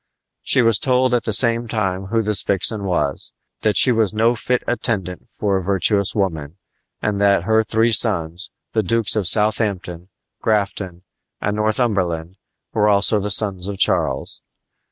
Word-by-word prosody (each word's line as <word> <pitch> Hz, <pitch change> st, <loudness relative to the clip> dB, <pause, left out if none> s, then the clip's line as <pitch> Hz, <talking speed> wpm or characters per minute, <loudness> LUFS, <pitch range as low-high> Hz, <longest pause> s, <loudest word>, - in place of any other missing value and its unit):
She 130 Hz, -, +2 dB
was 115 Hz, -2 st, +4 dB
told 130 Hz, -2 st, +1 dB
at 120 Hz, -, 0 dB
the 110 Hz, -, -1 dB
same 115 Hz, +1 st, +2 dB
time 95 Hz, -4 st, -2 dB
who 115 Hz, +2 st, 0 dB
this 105 Hz, -2 st, +2 dB
vixen 100 Hz, +2 st, 0 dB
was 90 Hz, -2 st, -2 dB, 0.3 s
that 105 Hz, -1 st, +1 dB
she 130 Hz, -, +5 dB
was 110 Hz, -3 st, 0 dB
no 115 Hz, +2 st, +2 dB
fit 125 Hz, +2 st, -2 dB
attendant 95 Hz, -7 st, -2 dB
for 100 Hz, -2 st, -2 dB
a 95 Hz, -, -4 dB
virtuous 100 Hz, +2 st, 0 dB
woman, 80 Hz, -5 st, -3 dB, 0.5 s
and 100 Hz, -1 st, -1 dB
that 100 Hz, -3 st, +3 dB
her 110 Hz, +3 st, +2 dB
three 110 Hz, +2 st, +1 dB
sons, 90 Hz, -5 st, +1 dB, 0.2 s
the 110 Hz, -, 0 dB
Dukes 110 Hz, +3 st, 0 dB
of 105 Hz, -5 st, -1 dB
Southampton, 100 Hz, -4 st, 0 dB, 0.3 s
Grafton, 100 Hz, -4 st, -2 dB, 0.4 s
and 105 Hz, 0 st, -2 dB
Northumberland, 100 Hz, -6 st, -1 dB, 0.4 s
were 105 Hz, -1 st, +2 dB
also 100 Hz, +1 st, +3 dB
the 105 Hz, +1 st, -4 dB
sons 100 Hz, -2 st, +1 dB
of 100 Hz, -1 st, -5 dB
Charles. -, -, -1 dB
105 Hz, 155 wpm, -19 LUFS, 95-110 Hz, 0.5 s, she